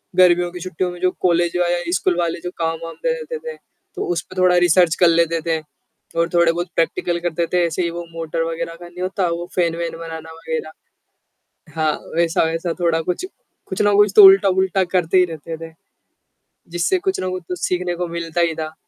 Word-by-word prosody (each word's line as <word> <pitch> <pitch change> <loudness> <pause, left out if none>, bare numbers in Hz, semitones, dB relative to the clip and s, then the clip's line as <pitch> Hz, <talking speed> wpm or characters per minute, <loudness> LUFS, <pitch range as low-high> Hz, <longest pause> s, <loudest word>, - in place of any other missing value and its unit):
गर्मियों 175 -1 +4
की 180 - -8
छुट्टियों 180 0 -3
में 175 - -10
जो 185 - +3
कॉलेज 175 -1 +2
वा 175 -1 +2
या 175 0 +1 0.2
स्कूल 180 -1 +1
वाले 170 -1 -1
जो 180 - -3
काम-वाम 165 0 -3
दे - - +2
देते 480 - -5
थे, 475 -1 -7 0.4
तो - - -3
उसपे 170 +2 -6
थोड़ा 180 -1 +4
रिसर्च 175 -1 +4
कर 175 - +6
लेते 165 -1 +2
थे। 160 -1 +1 0.6
और 170 - +2
थोड़े-बहुत 170 +1 +2
प्रैक्टिकल 170 +1 0
करते 170 -1 -1
थे, 180 - +3
ऐसे 170 +2 -2
ही 170 - 0
वो 170 +1 -6
मोटर 165 0 -3
वग़ैरह 165 0 -4
का 175 - -9
नहीं 175 +1 -10
होता 185 0 -1
वो 170 +1 -3
फेन 170 -2 +1
वेन 165 -1 -4
बनाना 160 -1 -8
वग़ैरह। 160 -1 -5 1.0
हाँ, 155 -1 +1 0.2
वैसा, 170 0 +2
वैसा 165 +1 -1
थोड़ा 165 -2 +1
कुछ, 180 - -3 0.4
कुछ 190 - -2
ना 205 0 +3
कुछ 205 -1 +4
तो 210 - +10
उल्टा-वूल्टा 190 -1 +5
करते 180 0 +2
ही 180 - +6
रहते 160 +1 -7
थे। - - -15 1.0
जिससे 175 - +1
कुछ 380 -1 0
ना 185 - -2
कुछ 185 0 -5
तो 180 - -2
सीखने 180 -1 -1
को 180 0 -3
मिलता 170 0 -3
ही 170 -1 +2
था 155 0 -7
175 Hz, 205 wpm, -20 LUFS, 165-180 Hz, 1.0 s, तो